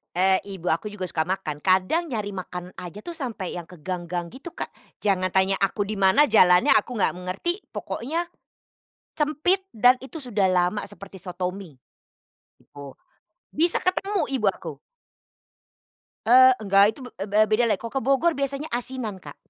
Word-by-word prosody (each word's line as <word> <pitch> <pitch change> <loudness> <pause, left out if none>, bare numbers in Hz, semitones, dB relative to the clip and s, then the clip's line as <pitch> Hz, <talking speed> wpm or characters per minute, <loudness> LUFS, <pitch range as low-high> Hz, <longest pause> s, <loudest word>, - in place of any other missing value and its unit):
Eee, 190 +1 +3
ibu 190 -3 -5
aku 185 +6 -1
juga 190 -3 -5
suka 160 -2 -1
makan, 180 -4 -3
kadang 190 - +2
nyari 210 -9 -4
makan 180 -1 -6
aja 180 +3 -8
tuh 340 +9 -8
sampai 230 - -5
yang 175 - -5
ke 175 0 -15
gang-gang 175 +1 -4
gitu, 270 - -10
Kak. - - -5 0.3
Jangan 185 -3 0
tanya 190 0 +3
aku 200 +1 -1
di 215 - -3
mana 195 +10 +4
jalannya, 180 -5 +5
aku 225 +1 -1
nggak - - +1
ngerti. 195 - -3
Pokoknya 330 +8 -3 0.9
sempit 315 +6 +1
dan 245 +3 +5
itu 270 +5 -9
sudah 215 -7 0
lama 185 +2 +1
seperti 200 -1 -11
soto 180 0 -4
mi. 185 -4 -10 0.8
Gitu. 140 -2 -12 0.6
Bisa 335 +3 +2
ketemu 375 -2 0
ibu 225 -6 0
aku. 165 -4 -8 1.5
Eee, 255 +2 +8
nggak, 195 0 +6
itu - - -15
be 250 - -9 0.2
be 205 +1 0
bedalah. 220 0 +3
Kalau 230 - -7
ke 270 - -1
Bogor 275 +7 +3
biasanya 280 +2 -2
asinan, 240 -4 -3
Kak. 145 -5 -11
205 Hz, 160 wpm, -24 LUFS, 185-260 Hz, 1.5 s, Eee